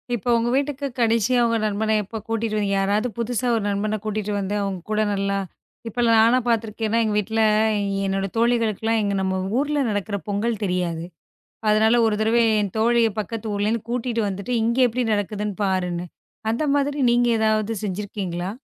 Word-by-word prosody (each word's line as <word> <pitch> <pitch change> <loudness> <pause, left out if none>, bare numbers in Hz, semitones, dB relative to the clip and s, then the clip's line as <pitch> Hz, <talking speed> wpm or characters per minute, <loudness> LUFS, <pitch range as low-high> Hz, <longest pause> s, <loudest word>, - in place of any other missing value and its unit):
இப்போ 240 +1 -4
உங்க 235 +1 0
வீட்டுக்குக் 280 -2 -2
கடைசியா 230 +1 +2
உங்க 230 0 +1
நண்பனை 215 +1 0
எப்போ 215 +3 -7
கூட்டிட்டு 225 -1 -1
வந்தீங்க. 200 -1 0
யாராவது 205 +4 +1
புதுசா 245 +1 -1
ஒரு 220 - -1
நண்பனைக் 210 +1 -2
கூட்டிட்டு 210 -1 -2
வந்து 200 +1 -2
உங்க 190 -2 -4
கூட 215 0 +2
நல்லா 200 0 -1 0.5
இப்ப 230 +2 -8
எல்லாம் 230 -1 +4
நாலாம் 240 +2 +3
பார்த்திருக்கிறேன் 225 -1 0
ஏன்னா 230 +2 +2
எங்க 215 -1 0
வீட்டுல 220 +2 0 0.6
என்னோட 195 0 -1
தோழிகளுக்கு 230 -3 +1
எல்லாம் 225 0 +2
எங்க 200 -1 0
நம்ம 190 0 0 0.2
ஊர்ல 290 +2 0
நடக்குற 205 0 -2
பொங்கல் 210 +2 -1
தெரியாது. 180 -3 -1 0.7
அதுனால 215 +2 +4
ஒரு 220 - +1
தடவை 225 +2 +3 0.2
என் 200 -1 -3
தோழிய 230 +1 +3
பக்கத்து 225 +2 -5
ஊரலிருந்து 210 +2 0
கூட்டிட்டு 240 -1 -1
வந்துட்டு, 200 +5 -4
இங்க 235 +1 +1
எப்டி 245 +2 -1
நடக்குதுன்னு 210 0 -2
பாருன்னு. 180 -2 -1 0.5
அந்த 230 +7 0
மாதிரி 285 +1 0
நீங்க 240 0 +3
எதாவது 215 0 +1
செஞ்சிருக்கீங்களா? 190 -2 -4
215 Hz, 165 wpm, -23 LUFS, 200-230 Hz, 0.7 s, எல்லாம்